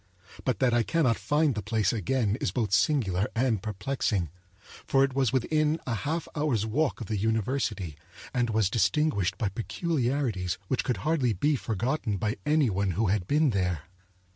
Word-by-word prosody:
But 130 Hz, -, +1 dB
that 130 Hz, -2 st, +2 dB
I 120 Hz, -, +4 dB
cannot 130 Hz, -2 st, +2 dB
find 150 Hz, -1 st, +2 dB
the 105 Hz, -, -3 dB
place 105 Hz, 0 st, 0 dB
again 110 Hz, 0 st, 0 dB
is -, -, +1 dB
both 110 Hz, -6 st, -1 dB
singular 95 Hz, -, +2 dB
and 115 Hz, -4 st, +1 dB
perplexing; 105 Hz, -, -2 dB, 0.6 s
for 135 Hz, 0 st, +4 dB
it 135 Hz, -1 st, 0 dB
was 130 Hz, -3 st, +2 dB
within 155 Hz, +4 st, +1 dB
a 125 Hz, -, -2 dB
half 155 Hz, +9 st, -2 dB
hour's 145 Hz, -8 st, +1 dB
walk 135 Hz, +4 st, 0 dB
of -, -, -4 dB
the 110 Hz, +1 st, -2 dB
university 110 Hz, -, -1 dB, 0.4 s
and 120 Hz, -1 st, +1 dB
was 110 Hz, -3 st, +1 dB
distinguished 110 Hz, -, +1 dB
by 105 Hz, -, 0 dB
peculiarities 120 Hz, -, -1 dB
which 130 Hz, -, +1 dB
could 125 Hz, -5 st, -1 dB
hardly 145 Hz, -7 st, +2 dB
be 145 Hz, +11 st, +1 dB
forgotten 115 Hz, -1 st, -1 dB
by 110 Hz, +5 st, -1 dB
any 150 Hz, -6 st, +3 dB
one 95 Hz, -1 st, 0 dB
who 110 Hz, -3 st, +2 dB
had 95 Hz, -2 st, 0 dB
been 150 Hz, +1 st, +3 dB
there. 90 Hz, -6 st, -1 dB
115 Hz, 170 wpm, -28 LUFS, 100-140 Hz, 0.6 s, I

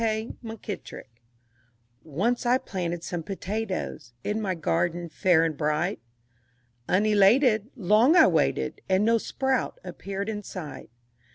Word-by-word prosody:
K. 220 Hz, 0 st, -1 dB
MUNKITTRICK 205 Hz, -, -8 dB, 0.8 s
Once 195 Hz, -, -1 dB
I 245 Hz, +1 st, +4 dB
planted 175 Hz, -7 st, -4 dB
some 175 Hz, -2 st, -4 dB
potatoes 195 Hz, -, -4 dB
In 210 Hz, +1 st, -1 dB
my 190 Hz, -3 st, -1 dB
garden 170 Hz, +1 st, -1 dB
fair 175 Hz, -2 st, +3 dB
and 160 Hz, -2 st, -2 dB
bright; 155 Hz, +5 st, -1 dB, 0.9 s
Unelated 215 Hz, +3 st, +4 dB
Long 225 Hz, -, +4 dB
I 330 Hz, -, +8 dB
waited, -, -, +1 dB
And 190 Hz, +2 st, +3 dB
no 230 Hz, 0 st, +4 dB
sprout 265 Hz, -, -1 dB
appeared 195 Hz, +1 st, -5 dB
in 210 Hz, -2 st, -3 dB
sight. 180 Hz, -6 st, -8 dB
200 Hz, 120 wpm, -26 LUFS, 175-225 Hz, 0.9 s, I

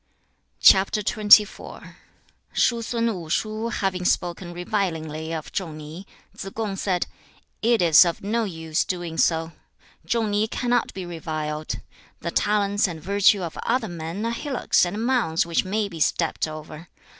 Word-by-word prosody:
XXIV. 210 Hz, +1 st, +4 dB, 0.6 s
Shu 235 Hz, -1 st, +2 dB
sun 230 Hz, 0 st, -1 dB
Wu 170 Hz, -5 st, -8 dB
shu 215 Hz, +6 st, -1 dB
having 190 Hz, -5 st, -2 dB
spoken 175 Hz, 0 st, -1 dB
revilingly 165 Hz, -4 st, -3 dB
of 160 Hz, -2 st, -5 dB
Chung 165 Hz, -6 st, -4 dB
ni, 155 Hz, +5 st, -9 dB, 0.3 s
Tsze 195 Hz, -, -8 dB
kung 215 Hz, -3 st, -2 dB
said, 185 Hz, -2 st, -1 dB, 0.6 s
'It 230 Hz, -3 st, +3 dB
is 165 Hz, 0 st, +8 dB
of 170 Hz, +1 st, -3 dB
no 225 Hz, +3 st, 0 dB
use 160 Hz, -4 st, -2 dB
doing 175 Hz, -3 st, -4 dB
so. 165 Hz, 0 st, +2 dB, 0.6 s
Chung 225 Hz, -3 st, 0 dB
ni 205 Hz, +2 st, +1 dB
cannot 245 Hz, +1 st, 0 dB
be 190 Hz, -2 st, -5 dB
reviled. 155 Hz, -2 st, -4 dB, 0.4 s
The -, -, -3 dB
talents 205 Hz, -1 st, +1 dB
and 165 Hz, -3 st, -6 dB
virtue 200 Hz, +2 st, +3 dB
of 165 Hz, -, -5 dB
other 240 Hz, -1 st, 0 dB
men 170 Hz, +4 st, -5 dB
are 230 Hz, -, 0 dB
hillocks 250 Hz, -, +1 dB
and 210 Hz, +6 st, -3 dB
mounds 235 Hz, -12 st, +1 dB
which 170 Hz, +1 st, 0 dB
may 205 Hz, +2 st, -1 dB
be 170 Hz, -4 st, -9 dB
stepped 160 Hz, +1 st, 0 dB
over. 155 Hz, +1 st, -9 dB
190 Hz, 145 wpm, -24 LUFS, 165-215 Hz, 0.6 s, is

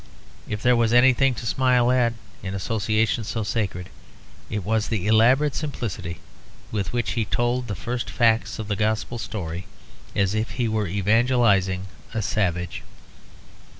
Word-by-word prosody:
If 105 Hz, 0 st, -4 dB
there 125 Hz, -1 st, +5 dB
was 115 Hz, -1 st, +2 dB
anything 130 Hz, +1 st, +5 dB
to 115 Hz, -, -7 dB
smile 125 Hz, 0 st, +3 dB
at, 120 Hz, -2 st, +3 dB, 0.3 s
in 95 Hz, 0 st, -4 dB
associations 110 Hz, +1 st, 0 dB
so 115 Hz, -, -2 dB
sacred, 95 Hz, -5 st, -2 dB, 0.6 s
it 105 Hz, -2 st, -3 dB
was 110 Hz, 0 st, +1 dB
the 105 Hz, -5 st, -2 dB
elaborate 125 Hz, +7 st, +4 dB
simplicity 115 Hz, -, -4 dB, 0.5 s
with 100 Hz, -3 st, -2 dB
which 120 Hz, -1 st, -1 dB
he 115 Hz, -, 0 dB
told 120 Hz, +3 st, 0 dB
the 100 Hz, -, -3 dB
first 120 Hz, +3 st, -4 dB
facts 115 Hz, -1 st, +2 dB
of 110 Hz, -, -5 dB
the 105 Hz, -, -1 dB
Gospel 110 Hz, +3 st, -1 dB
story, 90 Hz, -5 st, -5 dB, 0.5 s
as 100 Hz, 0 st, +2 dB
if 110 Hz, +1 st, -2 dB
he 120 Hz, -2 st, 0 dB
were 110 Hz, -2 st, 0 dB
evangelising 100 Hz, -1 st, +2 dB, 0.3 s
a 110 Hz, -, 0 dB
savage. 90 Hz, -4 st, -1 dB
110 Hz, 150 wpm, -24 LUFS, 100-120 Hz, 0.6 s, there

